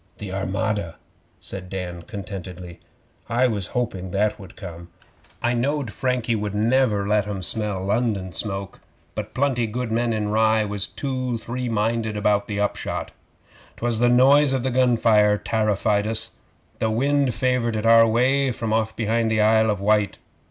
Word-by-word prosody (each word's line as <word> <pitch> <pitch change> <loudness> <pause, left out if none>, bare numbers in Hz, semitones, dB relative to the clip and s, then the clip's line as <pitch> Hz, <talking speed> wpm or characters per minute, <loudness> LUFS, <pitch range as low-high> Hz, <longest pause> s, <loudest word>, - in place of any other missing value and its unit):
'The 100 -2 -7
Armada!' 95 -2 -2 0.4
said 95 -2 -7
Dan 90 -2 -5
contentedly. 90 -3 -8 0.5
'I 120 +2 +2
was 100 -5 -2
hoping 95 -7 -2
that 105 +3 0
would 95 -3 -12
come.' 85 -3 -9 0.5
'I 120 - +2
knowed 130 0 -1
Frankie 125 -3 0
would 105 -1 -3
never 110 -2 +2
let 105 0 +2
'em 100 -2 -4
smell 105 -1 -2
London 100 -3 0
smoke, 100 +1 -1 0.3
but 110 0 -6
plenty 130 -4 +1
good 120 +1 -3
men 115 +1 +1
in 105 -2 -1
Rye 110 0 +3
was 100 -1 -2
two 130 -3 -3
three 120 +2 -4
minded 110 0 -1
about 105 -1 +1
the 105 -1 -3
upshot. 105 - -2 0.7
'Twas 120 -1 -1
the 120 0 +4
noise 135 +3 +5
of 130 -2 0
the 130 - 0
gun 125 -1 +3
fire 105 -2 +4
tarrified 105 -1 0
us. 110 0 -2 0.5
The 110 - +1
wind 135 +2 +1
favoured 125 -3 0
it 110 +1 -2
our 115 0 +7
way 130 +4 +2
from 115 -2 -3
off 110 0 0
behind 115 0 0
the 110 -1 +1
Isle 110 +1 +4
of 105 -2 0
Wight. 105 0 +2
110 Hz, 165 wpm, -23 LUFS, 100-120 Hz, 0.7 s, our